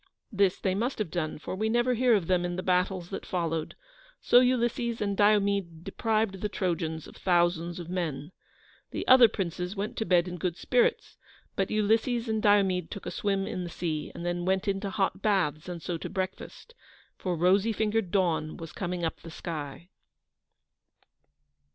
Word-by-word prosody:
This 200 -3 +2
they 190 - 0
must 235 +7 -1
have 210 -7 -3
done, 155 -3 -2
for 155 - -6
we 215 +3 -1
never 240 +2 +2
hear 245 -1 +4
of 195 -5 0
them 180 0 +2
in 175 0 -2
the 185 - -4
battles 180 0 0
that - - -5
followed, 165 -3 -2 0.4
so 245 - +6
Ulysses 240 -2 +1
and 200 -1 -1
Diomede 200 -5 +2
deprived 215 -3 -1
the 210 - -1
Trojans 165 -5 -2
of - - -13
thousands 175 -1 +1
of 170 - -7
men. 165 -4 -3 0.6
The - - -5
other 255 -2 +9
princes 180 -2 -4
went 205 +2 -3
to 220 - -1
bed 175 0 +3
in 180 0 -5
good 180 -1 -2
spirits, 485 -1 +1 0.4
but - - 0
Ulysses 225 +3 +1
and 220 -1 0
Diomede 195 -4 +3
took 200 - -8
a - - -4
swim 195 -1 -1
in 180 - -4
the 175 - -5
sea, 160 -3 -3
and 170 - -6
then 175 0 -1
went 190 +3 0
into 195 0 -1
hot 195 0 -1
baths, 180 -6 0
and 170 -3 -6
so 170 -2 -3
to - - -5
breakfast, 190 - -5 0.4
for 180 -2 -2
rosy 190 +6 +3
fingered 220 -2 0
Dawn 170 -5 0
was 165 -1 -8
coming 180 -2 -3
up 160 - -2
the 165 - -11
sky. 160 0 -6
185 Hz, 180 wpm, -28 LUFS, 175-210 Hz, 0.6 s, other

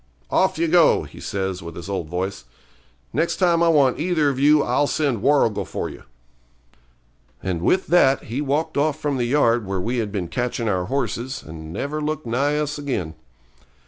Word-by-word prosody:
'Off 190 0 +2
you 165 +1 +1
go,' 170 0 +4
he - - -12
says, 95 -2 -3
with 85 -1 -8
his 85 - -8
old 95 -5 -3
voice. 90 -6 -3 0.7
'Next 170 - +1
time 170 -3 +2
I 170 - +4
want 145 -6 +3
either 160 -3 +2
of 135 -2 -3
you 150 +1 +5
I'll 145 - +1
send 140 -10 0
Warrigal 140 -6 +2
for - - -4
you.' - - -11 1.4
And 90 -3 -2
with 185 - +2
that 140 -6 +4
he 120 +5 -4
walked 145 +2 -1
off 155 +1 +1
from 145 -3 -1
the 120 - 0
yard 120 -5 +2
where 95 -1 -2
we 120 +7 -2
had 105 -3 -2
been 95 -4 -3
catching 120 +3 -2
our 90 -4 0
horses, 130 +2 -3
and 80 0 -9
never 145 - -3
looked 155 -1 -3
nigh 140 +6 0
us 150 0 -2
again. 110 - -3
135 Hz, 185 wpm, -22 LUFS, 100-150 Hz, 1.4 s, you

